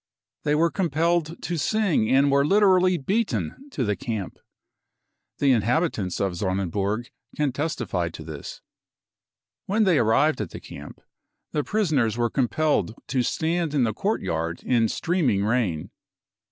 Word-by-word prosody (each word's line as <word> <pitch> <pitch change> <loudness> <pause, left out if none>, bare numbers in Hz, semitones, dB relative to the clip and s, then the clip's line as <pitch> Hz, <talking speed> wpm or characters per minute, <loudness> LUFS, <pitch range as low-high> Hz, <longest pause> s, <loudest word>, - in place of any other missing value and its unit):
They 150 0 +2
were 165 +2 +3
compelled 170 -1 0
to 170 -2 -2
sing 195 - +1
and 135 +1 +4
were 140 0 +4
literally 185 +1 +4
beaten 225 - -2
to 140 - -2
the 105 -1 0
camp. 105 0 -5 1.0
The 140 -1 +3
inhabitants 115 - 0
of 95 -2 0
Sonnenburg 100 +5 -2 0.3
can 150 -2 +1
testify 120 - -2
to 80 -1 -9
this. 75 -3 -8 1.1
When 215 +3 +2
they 185 -7 +4
arrived 120 +5 +3
at 100 - -4
the - - -8
camp, 70 0 -11 0.5
the 150 - 0
prisoners 145 - +1
were 120 -1 0
compelled 135 -2 +1
to 130 0 +1
stand 160 +4 -1
in 135 - +3
the 110 -2 0
courtyard 85 - -2
in 115 -3 +2
streaming 135 - 0
rain. 105 -9 -1
135 Hz, 140 wpm, -25 LUFS, 105-170 Hz, 1.1 s, and